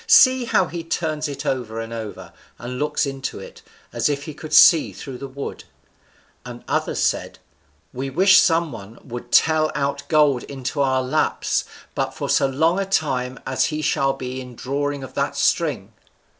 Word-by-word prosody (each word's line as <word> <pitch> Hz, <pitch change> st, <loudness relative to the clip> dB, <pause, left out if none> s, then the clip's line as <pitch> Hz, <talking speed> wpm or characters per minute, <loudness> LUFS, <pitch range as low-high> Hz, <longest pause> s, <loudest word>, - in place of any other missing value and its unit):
See 260 Hz, -, +6 dB
how 190 Hz, -, +2 dB
he 170 Hz, 0 st, -6 dB
turns 160 Hz, -2 st, -2 dB
it 145 Hz, -, -6 dB
over 115 Hz, -4 st, -2 dB
and 115 Hz, 0 st, -6 dB
over, 110 Hz, -2 st, -7 dB, 0.2 s
and 125 Hz, +1 st, -6 dB
looks 150 Hz, 0 st, 0 dB
into 135 Hz, -1 st, -5 dB
it, -, -, -11 dB, 0.3 s
as -, -, +1 dB
if 140 Hz, -1 st, -2 dB
he 155 Hz, -, -7 dB
could 155 Hz, +1 st, -10 dB
see 165 Hz, -3 st, +7 dB
through 130 Hz, -3 st, -8 dB
the 140 Hz, -, -6 dB
wood." 140 Hz, +1 st, -7 dB, 0.8 s
And 120 Hz, -1 st, -9 dB
others -, -, -1 dB
said, -, -, -1 dB, 0.6 s
"We 135 Hz, +2 st, -4 dB
wish 190 Hz, +6 st, +6 dB
some 165 Hz, -2 st, +2 dB
one 110 Hz, -1 st, -10 dB
would 120 Hz, -1 st, -8 dB
tell 155 Hz, -1 st, +4 dB
out 140 Hz, 0 st, -1 dB
gold 150 Hz, -5 st, +3 dB
into 135 Hz, +1 st, -4 dB
our 130 Hz, -1 st, +2 dB
laps 140 Hz, +5 st, 0 dB, 0.3 s
but -, -, -2 dB
for -, -, -4 dB
so 135 Hz, -, +3 dB
long 160 Hz, +7 st, +1 dB
a 195 Hz, -, 0 dB
time 130 Hz, -8 st, -1 dB
as 130 Hz, -, +1 dB
he 155 Hz, 0 st, -3 dB
shall 135 Hz, -1 st, +1 dB
be 130 Hz, -1 st, -6 dB
in 125 Hz, -1 st, -10 dB
drawing 140 Hz, +2 st, -3 dB
of 130 Hz, 0 st, -9 dB
that 140 Hz, 0 st, -2 dB
string." 140 Hz, -, 0 dB
140 Hz, 180 wpm, -22 LUFS, 130-155 Hz, 0.8 s, see